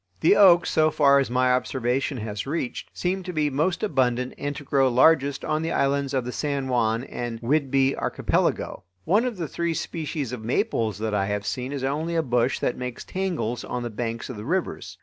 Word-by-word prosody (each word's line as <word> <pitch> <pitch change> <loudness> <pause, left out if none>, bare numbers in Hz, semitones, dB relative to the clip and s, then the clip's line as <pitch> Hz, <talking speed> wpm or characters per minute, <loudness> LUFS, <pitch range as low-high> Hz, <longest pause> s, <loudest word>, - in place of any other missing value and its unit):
The 395 - +5
oaks, 175 -4 +6
so 155 0 +4
far 140 -2 +4
as 135 - 0
my 125 +1 +2
observation 130 +2 -1
has 105 0 -5
reached, 140 -4 -3
seem 185 +2 -2
to 185 0 -6
be 150 -3 0
most 165 +7 0
abundant 125 - +1
and 145 0 -4
to 145 - -7
grow 135 -1 +2
largest 140 +2 +3
on 155 0 0
the 165 +1 -2
islands 140 -1 0
of 130 -2 0
the 125 - -3
San 140 -1 -2
Juan 115 -1 +1
and 120 -3 -5
Whidbey 135 +1 +2
Archipelago. - - -1 0.2
One 210 +7 +3
of 245 -5 -3
the 165 -3 -3
three 170 +2 -2
species 155 -6 -4
of 125 -3 -6
maples 115 - 0
that 110 0 -2
I 100 -1 +1
have 105 0 -2
seen 125 +5 -3
is 140 -2 -4
only 155 +5 -1
a 165 - +2
bush 125 -1 +1
that 125 - -2
makes 125 -1 -5
tangles 175 - -2
on 125 -1 -4
the 120 - -4
banks 115 +1 -4
of 125 - -7
the 105 - -7
rivers. 150 - -2
135 Hz, 210 wpm, -25 LUFS, 120-155 Hz, 0.2 s, oaks